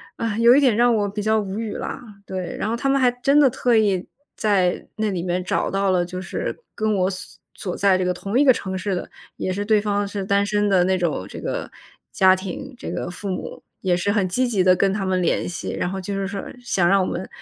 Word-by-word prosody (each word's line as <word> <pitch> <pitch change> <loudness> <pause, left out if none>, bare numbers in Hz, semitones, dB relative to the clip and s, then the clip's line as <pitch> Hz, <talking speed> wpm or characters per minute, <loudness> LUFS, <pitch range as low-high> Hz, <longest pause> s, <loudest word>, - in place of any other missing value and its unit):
啊， 225 -2 -2
有 235 +2 +7
一 - - +6
点 255 -6 +4
让 240 +1 +4
我 205 -2 +1
比 205 +1 -4
较 220 +1 +2
无 200 +1 -4
语 220 -3 -3
了， - - -5 0.3
对， 185 -3 -5
然 - - -1
后 225 - 0
他 275 +3 -1
们 275 0 +3
还 250 -1 +4
真 275 +4 +2
的 290 - +7
特 245 -1 +1
意 195 -4 +2 0.3
在 195 -5 +1
那 215 -1 -1
里 180 -3 -2
面 180 +1 -1
找 - - 0
到 195 0 +1
了， 180 -1 +2
就 180 +1 -6
是 190 - -4
跟 215 -1 0
我 185 -1 +2
所 185 - -9
所 180 - -5
在 195 -1 +4
这 185 - 0
个 180 - +1
同 195 +6 -1
一 290 - +6
个 265 - +7
城 190 -3 -4
市 190 +1 -2
的， 180 - -4 0.3
也 185 - -2
是 205 - -2
对 215 0 +3
方 205 -1 -1
是 200 -1 -4
单 200 +1 +2
身 205 0 +1
的 190 -3 +4
那 190 0 +2
种 155 - -1
这 - - -8
个 - - -4 0.4
家 185 -1 +5
庭。 195 +9 -7
这 - - -6
个 - - -3
父 200 +3 -7
母 185 - -5 0.2
也 185 -2 +2
是 190 +3 0
很 205 -3 +1
积 250 +8 +1
极 205 -6 +1
地 185 0 +5
跟 195 +2 +2
他 200 - -2
们 185 -1 +1
联 170 - 0
系， 175 - -4
然 - - -2
后 190 +1 -4
就 200 +2 -4
是 195 -1 -2
说 200 -1 -5 0.2
想 190 -8 +1
让 195 +2 +4
我 185 - +1
们 185 +2 -4
200 Hz, 280 characters per minute, -22 LUFS, 185-220 Hz, 0.4 s, 有